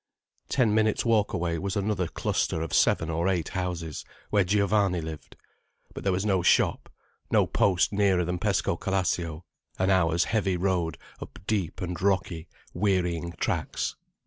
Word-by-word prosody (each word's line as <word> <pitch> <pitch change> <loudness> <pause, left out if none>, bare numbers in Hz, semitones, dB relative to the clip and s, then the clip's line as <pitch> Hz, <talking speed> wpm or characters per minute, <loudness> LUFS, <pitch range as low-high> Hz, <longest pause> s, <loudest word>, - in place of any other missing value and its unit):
Ten 120 -6 +2
minutes' 110 +1 +2
walk 110 -3 +2
away 85 -1 -1
was 100 +3 -3
another 100 -3 0
cluster 80 0 -1
of 80 - -6
seven 80 0 +3
or 85 +3 0
eight 90 -4 -1
houses, 90 -4 -4 0.3
where 105 -2 +4
Giovanni 100 -1 +2
lived. 80 -1 -8 0.6
But - - -7
there 100 - +2
was 95 +2 -1
no 95 -3 +2
shop, 90 - +2 0.4
no - - +4
post 95 0 +2
nearer 100 -3 +2
than 90 +1 -2
Pescocalascio, 90 -4 -1 0.3
an 95 +1 +2
hour's 85 -2 +3
heavy 95 -4 0
road 90 -3 0 0.2
up - - -9
deep 100 -4 -2
and 90 -1 -4
rocky, 95 -4 0 0.3
wearying 90 -3 0
tracks. - - -2
90 Hz, 145 wpm, -27 LUFS, 85-100 Hz, 0.6 s, where